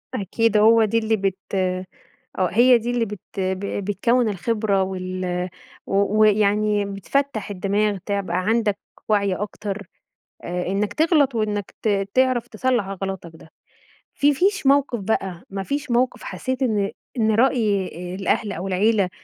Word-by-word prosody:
أكيد، 220 +1 +1
هو 225 +1 +6
دي 230 +2 0
اللي 220 0 +1
بت 195 -2 -1 0.2
آه، 185 0 0 0.7
هي 245 +4 +6
دي 235 +1 -3
اللي 240 -2 +1
بت 205 -2 -7 0.7
بتكون 235 +3 +2
الخبرة 205 0 0
وال 185 -1 -3 0.4
و 200 +2 +1
ويعني 210 0 +3
بتفتح 215 +4 -2
الدماغ، 200 +1 0
تبقى 200 -4 -1
عندك 220 -2 +1 0.3
وعي 200 -3 +2
أكتر، 205 -1 -5 0.6
آآ 180 0 -3
إنك 205 +2 -1
تغلط، 305 -6 +3
وإنك 210 -2 -2
ت 200 -2 +1
تعرف 255 -2 +2
تصلح 240 -2 0
غلطك 190 -3 -5
ده. 160 0 -16 0.6
في 290 +1 +3
فيش 395 +4 +1
موقف 275 -4 +3
بقى، 190 -3 -2
ما 195 0 -4
فيش 285 +3 -3
موقف 250 +1 +1
حسيت 260 +1 -4
إن 210 -5 0 0.3
إن 220 -1 +2
رأي 220 -6 +2 0.3
الأهل 200 +2 0
أو 190 0 -4
العيلة 195 0 +2
210 Hz, 135 wpm, -22 LUFS, 195-235 Hz, 0.7 s, هو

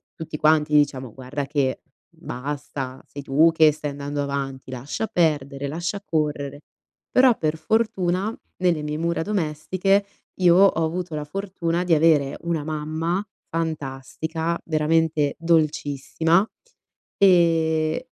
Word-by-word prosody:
tutti 160 -2 -6
quanti 150 0 +3
diciamo: 135 -5 +2
"Guarda 135 +2 -5
che 140 -2 -1 0.3
basta, 135 0 -6
sei 145 - -9
tu 150 +5 +4
che 160 -1 +5
stai 150 -1 -5
andando 145 +1 -4
avanti, 135 -2 -4
lascia 135 - -4
perdere, 145 -7 0
lascia 170 +7 -3
correre". 145 -3 -2 0.5
Però, 255 -2 +5
per 155 0 -1
fortuna, 195 +1 0 0.2
nelle 175 -4 +1
mie 150 0 -3
mura 170 +1 -1
domestiche 190 +2 0 0.3
io 175 -2 +5
ho 190 -3 +5
avuto 175 0 -4
la 150 -1 -3
fortuna 180 -1 -2
di 180 -2 +2
avere 150 -3 +3
una 170 -3 -1
mamma 160 +5 -2 0.3
fantastica, 160 +1 -3
veramente 155 -2 +1
dolcissima, 160 +3 +1 0.7
e 165 +1 +3
155 Hz, 120 wpm, -23 LUFS, 145-170 Hz, 0.7 s, che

